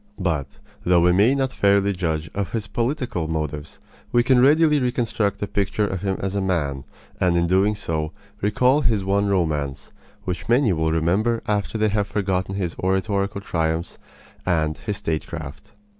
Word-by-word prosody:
But, 80 -6 -1 0.4
though 90 -1 +4
we 90 +1 +5
may 105 +9 +4
not 135 -1 0
fairly 100 0 +3
judge 80 -4 -2
of 100 -2 -3
his 110 -3 -2
political 120 - -2
motives, 75 -2 -4 0.3
we 120 -1 +4
can 130 0 +4
readily 150 +2 +5
reconstruct 115 -5 0
a - - +1
picture 100 +1 0
of 95 -3 -3
him 95 -1 -1
as 95 0 -2
a 100 - 0
man, 75 -7 -1 0.3
and 90 -1 +2
in 85 - +2
doing 95 +4 +2
so 80 -6 -3 0.3
recall 125 +8 +3
his 110 -7 +1
one 100 +1 +1
romance, 75 -8 -1 0.3
which 95 +2 -4
many 120 -4 +4
will 80 -1 0
remember 95 +9 +1
after 105 +1 -1
they 110 0 +2
have 105 0 0
forgotten 95 -2 -1
his 90 -4 -2
oratorical 100 +1 0
triumphs 80 -3 -2 0.4
and 80 -4 0
his 105 -1 -3
statecraft. 75 -6 -5
95 Hz, 165 wpm, -23 LUFS, 85-105 Hz, 0.4 s, we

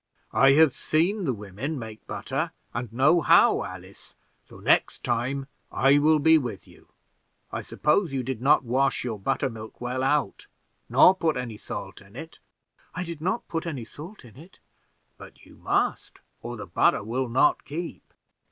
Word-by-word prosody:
"I 135 +5 +6
have 155 -2 +5
seen 180 +6 0
the 135 - +1
women 105 +9 -5
make 110 -3 -9
butter, - - -3 0.2
and 120 -1 -4
know 135 +8 +3
how, - - +5
Alice; - - -11 0.3
so - - -13
next - - +1
time 130 +3 -1 0.3
I 135 +2 +4
will 155 +2 +4
be 160 +2 +5
with 115 - -6
you. - - -19 0.6
I - - -4
suppose 160 +2 0
you 135 -2 -2
did 125 -2 -4
not 140 +2 +4
wash 130 +3 0
your 115 -4 -4
butter 135 +7 -1
milk 110 -3 -9
well 125 +1 -3
out, 135 -4 0 0.4
nor 185 - +7
put 165 -6 -1
any 120 -4 -5
salt 100 -1 -7
in 100 +2 -18
it?" 160 +5 -10 0.6
"I 180 - -2
did 170 -3 -7
not 220 +8 -2
put 165 0 -4
any 135 -8 -5
salt 160 - -12
in 120 0 -16
it." 165 +6 -16 0.6
"But - - -14
you - - -17
must, - - -1 0.2
or - - -6
the - - -7
butter - - +2
will 125 +4 -2
not 130 +5 +3
keep." 165 +4 -7
135 Hz, 170 wpm, -26 LUFS, 120-160 Hz, 0.6 s, nor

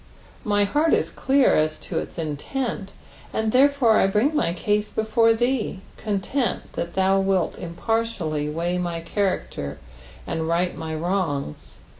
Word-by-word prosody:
My 205 -3 +2
beart 300 +10 +2
is - - +1
clear 270 0 +3
as 155 0 +1
to - - -2
its - - -7
intent,4ind 200 - -4
tlierefore 260 -3 +5
I - - +4
bring 220 +10 +2
my 170 - +2
case 210 +4 0
before 220 +1 +3
thee, 240 -5 0
content 215 +5 -2
that 170 0 -4
thou 190 0 +3
wilt 195 -3 +1
impBrtiallj 170 -5 -2
weigh 170 +3 -1
my 170 -2 -2
character, 170 - -2 0.5
and 160 0 -2
right 175 +2 +1
my 160 0 -4
wrongs. 160 - -2
195 Hz, 135 wpm, -24 LUFS, 170-225 Hz, 0.5 s, tlierefore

